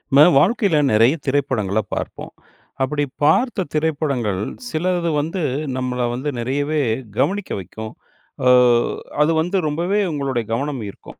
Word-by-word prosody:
நம்ம 145 Hz, -, +9 dB, 0.2 s
வாழ்க்கையில 200 Hz, -, +2 dB
நெறைய 115 Hz, +5 st, +5 dB
திரைப்படங்கள 115 Hz, -8 st, 0 dB, 0.2 s
பார்ப்போம். -, -, -6 dB, 0.5 s
அப்டி 145 Hz, +2 st, 0 dB, 0.2 s
பார்த்த 190 Hz, -, +2 dB
திரைப்படங்கள் 140 Hz, -, 0 dB, 0.3 s
சிலது 175 Hz, 0 st, 0 dB
வந்து, 165 Hz, +5 st, -2 dB, 0.4 s
நம்மள 125 Hz, -1 st, -1 dB
வந்து 130 Hz, +4 st, -3 dB
நெறையவே 145 Hz, +5 st, -1 dB, 0.4 s
கவனிக்க 200 Hz, 0 st, 0 dB
வைக்கும். 110 Hz, +4 st, -8 dB, 0.5 s
அ -, -, +4 dB, 0.8 s
அது 155 Hz, -, +2 dB
வந்து 180 Hz, +4 st, -1 dB
ரொம்பவே 175 Hz, +7 st, 0 dB
உங்களுடைய 135 Hz, -5 st, -2 dB
கவனம் 140 Hz, +1 st, -2 dB
ஈர்க்கும். -, -, -13 dB
145 Hz, 120 wpm, -20 LUFS, 125-165 Hz, 0.8 s, நம்ம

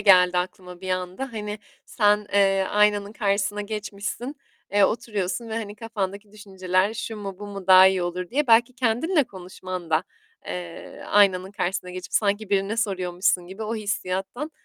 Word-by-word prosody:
geldi 180 Hz, -3 st, +6 dB
aklıma 180 Hz, 0 st, -5 dB
bir 185 Hz, -1 st, -5 dB
anda, 185 Hz, +8 st, -3 dB
hani 210 Hz, -1 st, -5 dB, 0.3 s
sen, 210 Hz, -2 st, +2 dB
eee, 195 Hz, -1 st, +4 dB
aynanın 210 Hz, 0 st, +2 dB
karşısına 205 Hz, -1 st, 0 dB
geçmişsin, 210 Hz, +5 st, -5 dB, 0.4 s
eee, 205 Hz, 0 st, +5 dB
oturuyorsun 210 Hz, 0 st, -2 dB
ve 220 Hz, -, -4 dB
hani 210 Hz, -2 st, -4 dB
kafandaki 205 Hz, -2 st, -4 dB
düşünceler 190 Hz, -1 st, -1 dB
şu 225 Hz, 0 st, -5 dB
mu, 195 Hz, -2 st, -6 dB
bu 205 Hz, -, -7 dB
mu, 195 Hz, -2 st, -8 dB
daha 185 Hz, 0 st, +9 dB
iyi 190 Hz, -1 st, +2 dB
olur 175 Hz, 0 st, -3 dB
diye 290 Hz, +3 st, +1 dB
belki 235 Hz, +1 st, +5 dB
kendinle 265 Hz, +7 st, +2 dB
konuşman 185 Hz, -3 st, -8 dB
da, 160 Hz, +3 st, +2 dB, 0.4 s
eee, 175 Hz, -2 st, -7 dB
aynanın 190 Hz, -2 st, +4 dB
karşısına 180 Hz, -1 st, -2 dB
geçip 180 Hz, -2 st, -8 dB
sanki 205 Hz, 0 st, +1 dB
birine 200 Hz, +2 st, +1 dB
soruyormuşsun 185 Hz, -4 st, 0 dB
gibi, 190 Hz, +4 st, -8 dB
o 220 Hz, +1 st, -2 dB
hissiyattan, 205 Hz, +6 st, -3 dB
200 Hz, 155 wpm, -24 LUFS, 185-215 Hz, 0.4 s, daha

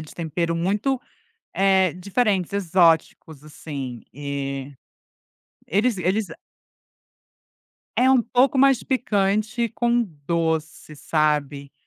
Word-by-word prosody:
de 155 Hz, -, -11 dB
tempero 170 Hz, 0 st, -2 dB
muito, 205 Hz, +10 st, 0 dB, 0.5 s
eh, 190 Hz, -2 st, +3 dB
diferentes, 195 Hz, 0 st, 0 dB
exóticos 165 Hz, -5 st, +1 dB
assim, 140 Hz, -5 st, -7 dB
eh, 140 Hz, -1 st, -5 dB, 1.0 s
eles 210 Hz, +4 st, +1 dB
eles 190 Hz, +4 st, 0 dB, 1.7 s
É 255 Hz, +1 st, +4 dB
um 260 Hz, -2 st, +4 dB
pouco 250 Hz, +3 st, +2 dB
mais 270 Hz, -3 st, +4 dB
picante 215 Hz, -1 st, 0 dB
com 240 Hz, +1 st, +1 dB, 0.2 s
doce, 160 Hz, -2 st, -2 dB
sabe. 150 Hz, -2 st, -1 dB
180 Hz, 90 wpm, -23 LUFS, 155-220 Hz, 1.7 s, É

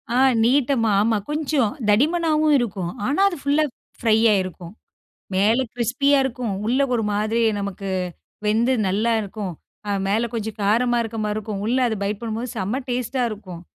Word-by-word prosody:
ஆ -, -, +3 dB, 0.3 s
நீட்டமா. 245 Hz, -2 st, +2 dB
ஆமா. 220 Hz, +1 st, +2 dB
கொஞ்சம் 295 Hz, -7 st, 0 dB, 0.2 s
தடிமனாவும் 310 Hz, +6 st, +3 dB
இருக்கும். 190 Hz, -7 st, -3 dB
ஆனா, 290 Hz, -, +1 dB
அது 350 Hz, -, -6 dB
ஃபுல்லா 285 Hz, +2 st, +2 dB, 0.4 s
ஃப்ரையா 220 Hz, -1 st, +4 dB
இருக்கும். 180 Hz, 0 st, -9 dB, 0.6 s
மேலே 220 Hz, +7 st, +3 dB
கிரிஸ்பியா 270 Hz, +4 st, +2 dB
இருக்கும். 245 Hz, -4 st, -3 dB
உள்ள 250 Hz, +4 st, +1 dB
ஒரு 230 Hz, -, +1 dB
மாதிரி 215 Hz, +3 st, 0 dB, 0.2 s
நமக்கு 200 Hz, 0 st, -5 dB, 0.6 s
வெந்து 230 Hz, +5 st, +2 dB, 0.2 s
நல்லா 215 Hz, +5 st, +1 dB
இருக்கும். 200 Hz, -2 st, -5 dB, 0.4 s
அ -, -, 0 dB, 0.2 s
மேல 225 Hz, +4 st, +1 dB
கொஞ்சம் 220 Hz, -1 st, -4 dB
காரமா 240 Hz, +4 st, +2 dB
இருக்கமாரி 215 Hz, -2 st, -3 dB
இருக்கும். 210 Hz, -2 st, -4 dB
உள்ள 245 Hz, +3 st, +1 dB
அத 220 Hz, -, -1 dB
பைட் 205 Hz, +1 st, -2 dB
பண்ணும்போது, 230 Hz, +2 st, -4 dB
செம 215 Hz, +6 st, -2 dB
டேஸ்டா 250 Hz, +1 st, -1 dB
இருக்கும். 185 Hz, -5 st, -8 dB
225 Hz, 150 wpm, -22 LUFS, 210-255 Hz, 0.6 s, ஃப்ரையா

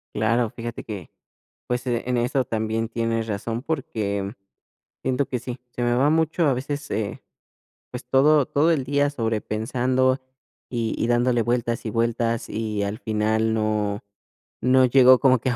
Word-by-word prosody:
Claro, 115 Hz, +1 st, +2 dB
fíjate 120 Hz, +1 st, -7 dB
que, 105 Hz, -5 st, -7 dB, 0.6 s
pues, 125 Hz, +1 st, -2 dB
e 120 Hz, -1 st, 0 dB
en 125 Hz, -, +1 dB
eso 125 Hz, +3 st, +1 dB
también 110 Hz, 0 st, -2 dB
tienes 115 Hz, -1 st, -1 dB
razón, 115 Hz, +2 st, -3 dB
porque, 115 Hz, -11 st, -2 dB
mm, 100 Hz, -, -4 dB, 0.7 s
siento 130 Hz, +1 st, 0 dB
que 125 Hz, -, -2 dB
sí. 125 Hz, +1 st, -6 dB
Se 120 Hz, -, -4 dB
me 120 Hz, 0 st, +2 dB
va 130 Hz, +4 st, +3 dB
mucho, 160 Hz, +1 st, +2 dB
a 140 Hz, -, +3 dB
veces, 145 Hz, +3 st, -4 dB
eh, 105 Hz, -2 st, -3 dB, 0.7 s
pues 125 Hz, +1 st, -7 dB
todo 145 Hz, +2 st, +5 dB
todo 150 Hz, +6 st, +2 dB
el 150 Hz, -5 st, +1 dB
día 145 Hz, +1 st, +2 dB
sobrepensando 125 Hz, +2 st, 0 dB, 0.5 s
y 115 Hz, -2 st, -2 dB
y -, -, 0 dB
dándole 120 Hz, 0 st, +2 dB
vueltas 120 Hz, 0 st, -1 dB
y -, -, -1 dB
vueltas, 115 Hz, 0 st, 0 dB
y 105 Hz, -2 st, -2 dB
al 100 Hz, +3 st, -3 dB
final 110 Hz, -1 st, 0 dB
no 105 Hz, -2 st, -1 dB, 0.6 s
no 130 Hz, +1 st, +4 dB
llego 130 Hz, 0 st, +6 dB
como 130 Hz, -2 st, +4 dB
que 130 Hz, -, -1 dB
a -, -, -1 dB
120 Hz, 165 wpm, -24 LUFS, 110-130 Hz, 0.7 s, llego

